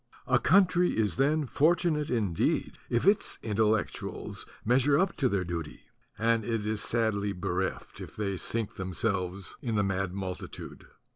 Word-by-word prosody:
A - - +3
country 180 -2 +4
is 110 -2 +1
then 150 +3 +2
fortunate 155 +2 +2
indeed 105 -9 0
if 120 +4 +1
its 200 +2 +3
Intellectuals 110 0 -1 0.2
measure 130 +5 +4
up 185 +1 +1
to 130 -3 +2
their 100 -3 0
duty; 85 -3 -5 0.4
and 115 0 +2
it 115 -1 -2
is 110 0 -1
sadly 105 -3 0
bereft 90 +1 -3
if - - -9
they 100 -2 -2
sink 115 +4 -2
themselves 95 0 -2
in 115 -4 -2
the 105 - +2
mad 95 -1 -1
multitude. 95 -1 -7
110 Hz, 145 wpm, -29 LUFS, 95-130 Hz, 0.4 s, country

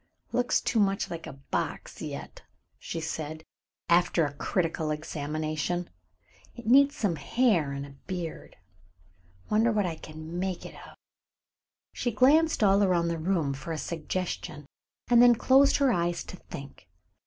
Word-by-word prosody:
"Looks 245 0 +1
too 230 - 0
much 195 -1 +1
like 165 -1 -6
a 160 - -7
box 135 +1 -4
yet," - - -7 0.4
she 165 - -5
said, 155 -1 -5 0.4
after 170 -1 +3
a 145 - -4
critical 160 +1 -1
examination. 155 +3 -3 0.6
"It 240 - -10
needs 275 +5 +5
some 185 -7 0
hair 205 - +2
and 140 0 -4
a 140 - -12 0.2
beard. 175 -3 -5 1.0
Wonder 225 +2 +4
what 210 -2 +1
I 175 - -2
can 155 +2 -8
make 185 -1 -3
it - - -9
of." - - -13 1.0
She 245 - -1
glanced 280 +6 +4
all 200 0 +5
around 175 -3 +2
the 165 -1 -2
room 160 -4 0
for 140 +5 -7
a - - -3
suggestion, 160 -2 -4 0.4
and 240 -1 +6
then 245 -1 +7
closed 270 +4 +5
her 275 -4 +3
eyes 175 -1 0
to - - -9
think. 140 -5 -11
175 Hz, 150 wpm, -28 LUFS, 155-215 Hz, 1.0 s, then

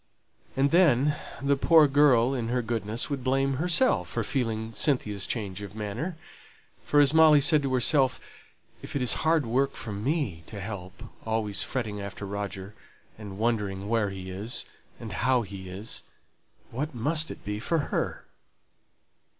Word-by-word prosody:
And 140 +1 +3
then 150 -5 +4 0.3
the 140 0 +3
poor 155 +2 +5
girl 135 -3 +4
in 120 -4 -2
her 125 +1 0
goodness 115 +3 -3
would 135 -3 -3
blame 135 +1 +1
herself 180 - +2
for - - -2
feeling 115 -4 -2
Cynthia's 105 -8 0
change 100 -4 -4
of 100 0 -8
manner; 115 - -4 0.7
for 145 - +4
as 145 0 +5
Molly 160 -2 +7
said 150 +1 +4
to 135 -2 -2
herself, 130 +1 +3 0.6
"If - - -9
it 140 - 0
is 125 - +3
hard 160 -3 +2
work 135 +4 +1
for 110 - -6
me 105 - -2
to 105 - -7
help 100 +1 -7 0.2
always 110 -2 0
fretting 110 -6 -3
after 100 0 -7
Roger, 100 0 -5 0.5
and 100 -3 -8
wondering 105 -4 -1
where 115 -3 +1
he 95 -1 -7
is, 105 +6 -2 0.3
and 110 -4 -7
how 125 +4 +2
he 95 -2 -9
is, 100 +5 -4 0.7
what 140 +4 -4
must 155 +7 +1
it - - -10
be 105 +1 -3
for 165 +9 0 0.2
her?" - - -2
120 Hz, 160 wpm, -27 LUFS, 105-140 Hz, 0.7 s, Molly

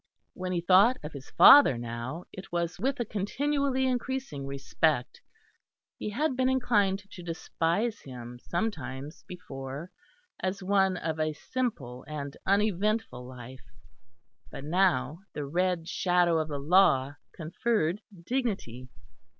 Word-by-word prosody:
When 185 0 -4
he 175 -1 0
thought 195 +8 +5
of 150 - -7
his 140 -1 -9
father 280 - +8
now, 120 +7 -5
it 190 +1 -10
was 170 -1 -2
with 265 +5 -1
a 240 - 0
continually 265 +6 0
increasing 255 - -2
respect. 140 0 -1 0.8
He - - -3
had 265 +6 0
been 260 0 +2
inclined 205 -7 +2
to 180 - -9
despise 175 +5 -1
him 125 -2 -9
sometimes 150 - -4
before, 140 -2 -7 0.5
as 190 +1 -3
one 190 -1 +2
of 160 -2 -3
a 155 0 0
simple 150 - -4
and 145 -2 -5
uneventful 205 - +1
life; 125 0 -11 0.8
but - - -8
now 160 -3 +1
the 145 - -4
red 175 +2 0
shadow 175 -3 +2
of 155 - -1
the 145 -2 -4
Law 145 -3 +3 0.2
conferred 180 +2 -1 0.2
dignity. 190 - -3
175 Hz, 125 wpm, -29 LUFS, 140-210 Hz, 0.8 s, father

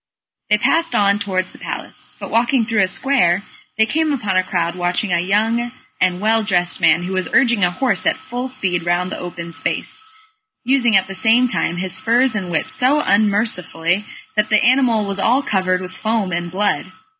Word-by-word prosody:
They 210 - +4
passed 330 +9 +1
on 200 0 +2
towards 185 -2 -2
the - - -16
palace, - - -6
but - - -8
walking 235 +1 +2
through 220 -2 +1
a 190 - +3
square, 200 -5 +1 0.3
they 220 - +4
came 315 +5 0
upon 215 -9 -2
a 185 - +4
crowd 170 -2 -2
watching 180 +2 -1
a 175 - +2
young 220 +6 0 0.3
and 180 -1 +1
well 220 +2 +2
dressed 180 -4 0
man 165 +1 +4
who 185 +2 -4
was 185 -3 -2
urging 240 -6 +3
a 180 - +4
horse 250 +9 0
at - - +2
full 245 +1 -5
speed 190 -10 -1
round 175 +2 -1
the - - -5
open 170 -1 -7
space, 300 - -2 0.6
using 245 -4 +3
at 190 - +1
the 195 - -8
same 225 +6 +3
time 175 -7 -1
his 185 0 -2
spurs 235 +6 +2
and 195 -4 -3
whip 160 -3 -2
so 270 +4 +3
unmercifully 200 - +1 0.3
that 210 0 +1
the 215 - +3
animal 245 -4 +3
was 200 0 -2
all 250 +8 +2
covered 185 -4 0
with 185 0 -7
foam 215 -1 -2
and 175 0 -3
blood. 185 -2 -1
200 Hz, 195 wpm, -18 LUFS, 180-235 Hz, 0.6 s, They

